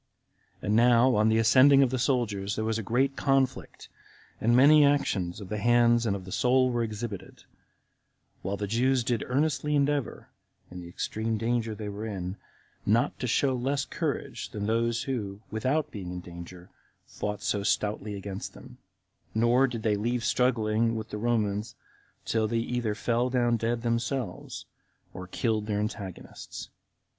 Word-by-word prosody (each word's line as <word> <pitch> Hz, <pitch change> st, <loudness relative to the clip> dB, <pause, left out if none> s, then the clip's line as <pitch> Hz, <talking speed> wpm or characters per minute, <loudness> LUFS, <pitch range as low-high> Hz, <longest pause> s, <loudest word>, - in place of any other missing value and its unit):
And 105 Hz, -, +1 dB
now, 120 Hz, +2 st, +5 dB
on 105 Hz, +1 st, +3 dB
the 110 Hz, -, +3 dB
ascending 130 Hz, +5 st, +6 dB
of 130 Hz, -, +1 dB
the 130 Hz, -, -1 dB
soldiers, 110 Hz, -7 st, 0 dB
there 110 Hz, -, -2 dB
was 110 Hz, 0 st, 0 dB
a -, -, -2 dB
great 130 Hz, +6 st, +1 dB
conflict, 135 Hz, -2 st, 0 dB, 0.5 s
and 120 Hz, +2 st, +3 dB
many 145 Hz, +4 st, +7 dB
actions 100 Hz, -11 st, +1 dB
of 100 Hz, -3 st, -9 dB
the 105 Hz, -, -3 dB
hands 120 Hz, 0 st, +4 dB
and 100 Hz, -, +1 dB
of 95 Hz, -2 st, -7 dB
the 95 Hz, -, -9 dB
soul 130 Hz, +3 st, +3 dB
were 120 Hz, -1 st, 0 dB
exhibited; 110 Hz, -2 st, -6 dB, 1.0 s
while 100 Hz, +2 st, -3 dB
the 105 Hz, -, -2 dB
Jews 125 Hz, +4 st, +1 dB
did 120 Hz, -1 st, -1 dB
earnestly 150 Hz, +2 st, 0 dB
endeavor, 145 Hz, -2 st, -1 dB, 0.4 s
in 90 Hz, 0 st, -7 dB
the 85 Hz, -, -9 dB
extreme 110 Hz, +5 st, -2 dB
danger 115 Hz, 0 st, -1 dB
they 105 Hz, 0 st, -6 dB
were 105 Hz, +2 st, -5 dB
in, 95 Hz, -2 st, -5 dB, 0.5 s
not 115 Hz, +4 st, +1 dB
to 125 Hz, -, -2 dB
show 130 Hz, +3 st, +2 dB
less 135 Hz, +3 st, -1 dB
courage -, -, -4 dB
than 105 Hz, -1 st, -4 dB
those 115 Hz, +2 st, 0 dB
who, 105 Hz, -7 st, -4 dB
without 130 Hz, +8 st, 0 dB
being 95 Hz, -5 st, -6 dB
in 90 Hz, -, -5 dB
danger, 85 Hz, +1 st, -11 dB, 0.3 s
fought 105 Hz, 0 st, -5 dB
so 100 Hz, -, 0 dB
stoutly 105 Hz, 0 st, -1 dB
against 100 Hz, 0 st, -6 dB
them; -, -, -13 dB, 0.6 s
nor 120 Hz, +4 st, +4 dB
did 115 Hz, -3 st, -5 dB
they 105 Hz, -2 st, +2 dB
leave 120 Hz, +3 st, -1 dB
struggling 115 Hz, -2 st, +1 dB
with 110 Hz, 0 st, -5 dB
the 105 Hz, -, -4 dB
Romans 105 Hz, -2 st, -1 dB, 0.5 s
till 110 Hz, -1 st, +1 dB
they 115 Hz, -, -1 dB
either 115 Hz, -2 st, -1 dB
fell 120 Hz, +3 st, 0 dB
down 120 Hz, -2 st, +2 dB
dead 115 Hz, +1 st, -1 dB
themselves, 115 Hz, -3 st, -3 dB, 0.5 s
or 95 Hz, 0 st, -8 dB
killed 110 Hz, +2 st, -1 dB
their 105 Hz, -1 st, -1 dB
antagonists. 100 Hz, -3 st, -6 dB
115 Hz, 165 wpm, -28 LUFS, 105-125 Hz, 1.0 s, many